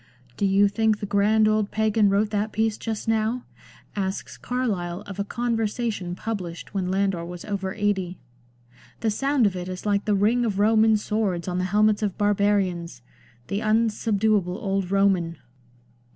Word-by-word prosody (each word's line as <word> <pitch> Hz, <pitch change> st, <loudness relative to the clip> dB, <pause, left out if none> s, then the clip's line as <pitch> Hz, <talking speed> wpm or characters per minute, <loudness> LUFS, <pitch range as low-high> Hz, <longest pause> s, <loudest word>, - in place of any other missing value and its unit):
" 125 Hz, -1 st, -30 dB
Do 200 Hz, -, +1 dB
you 195 Hz, +1 st, +4 dB
think 215 Hz, +1 st, +1 dB
the 205 Hz, -, -3 dB
grand 210 Hz, +2 st, +3 dB
old 215 Hz, -1 st, +1 dB
Pagan 215 Hz, -1 st, +2 dB
wrote 205 Hz, +2 st, +1 dB
that 210 Hz, +1 st, -1 dB
piece 220 Hz, 0 st, 0 dB
just 220 Hz, -1 st, -5 dB
now?" 225 Hz, +2 st, 0 dB, 0.5 s
asks 190 Hz, -1 st, -3 dB
Carlyle 200 Hz, -8 st, -2 dB
of 205 Hz, -1 st, -9 dB
a -, -, +1 dB
Conversation 225 Hz, -4 st, -2 dB
published 185 Hz, -5 st, -5 dB
when 190 Hz, -2 st, -1 dB
Landor 190 Hz, -2 st, 0 dB
was 175 Hz, 0 st, -8 dB
over 195 Hz, -2 st, -3 dB
eighty. 195 Hz, -4 st, -1 dB, 0.4 s
" 120 Hz, 0 st, -27 dB
The 225 Hz, -, +1 dB
sound 275 Hz, +2 st, +2 dB
of 195 Hz, -2 st, +1 dB
it 180 Hz, 0 st, -5 dB
is 185 Hz, +1 st, -6 dB
like 205 Hz, -1 st, +1 dB
the 210 Hz, -1 st, +2 dB
ring 220 Hz, +5 st, +2 dB
of 210 Hz, -5 st, -1 dB
Roman 220 Hz, +1 st, +4 dB
swords 205 Hz, -5 st, -1 dB
on 180 Hz, 0 st, -1 dB
the 185 Hz, -, 0 dB
helmets 210 Hz, +2 st, +3 dB
of 205 Hz, -3 st, -2 dB
barbarians! 195 Hz, -8 st, 0 dB, 0.4 s
The 200 Hz, -, -1 dB
unsubduable 215 Hz, -3 st, +1 dB
old 195 Hz, -3 st, -2 dB
Roman 190 Hz, -4 st, +2 dB
205 Hz, 165 wpm, -24 LUFS, 190-220 Hz, 0.5 s, you